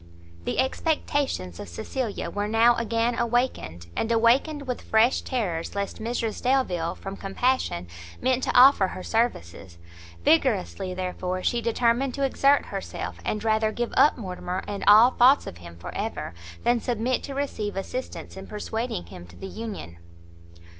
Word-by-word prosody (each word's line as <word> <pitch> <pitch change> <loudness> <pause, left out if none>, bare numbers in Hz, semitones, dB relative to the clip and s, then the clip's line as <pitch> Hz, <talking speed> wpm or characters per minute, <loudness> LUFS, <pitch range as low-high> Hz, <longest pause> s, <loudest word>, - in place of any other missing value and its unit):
The - - -2
expectations 265 - -1
of 100 - -7
Cecilia 225 - -4
were 205 0 -2
now 225 +2 +5
again 230 +1 0
awakened, 235 - -1
and 225 - -1
awakened 255 +6 +3
with 250 -2 -3
fresh 225 +3 +3
terrors 190 -12 -3
lest 200 -1 -3
Mrs 230 -1 -2
Delvile, 245 -11 +1
from 195 0 -7
compassion, 195 - -1 0.3
meant 260 0 +1
to - - +1
offer 255 -7 +7
her 185 - -7
services; 95 - -2 0.5
vigorously, 90 - +2
therefore, 185 0 -3
she 240 - +1
determined 235 +3 +1
to 280 - -2
exert 275 +1 +3
herself, 90 - -5
and 210 - -2
rather 220 -1 +2
give 240 +2 -3
up 295 - +5
Mortimer 185 -3 -4
and 200 -1 -4
all 220 +5 +8
thoughts 260 +3 +5
of 85 - -8
him 85 -1 -11
for 85 - -8
ever, - - -4 0.3
than 240 0 +3
submit 245 +1 0
to 275 - -7
receive 220 -8 -3
assistance 250 +7 -5
in 190 0 -9
persuading 215 - -4
him 85 0 -11
to 85 - -16
the - - -9
union. 200 - -7
225 Hz, 155 wpm, -25 LUFS, 185-250 Hz, 0.5 s, all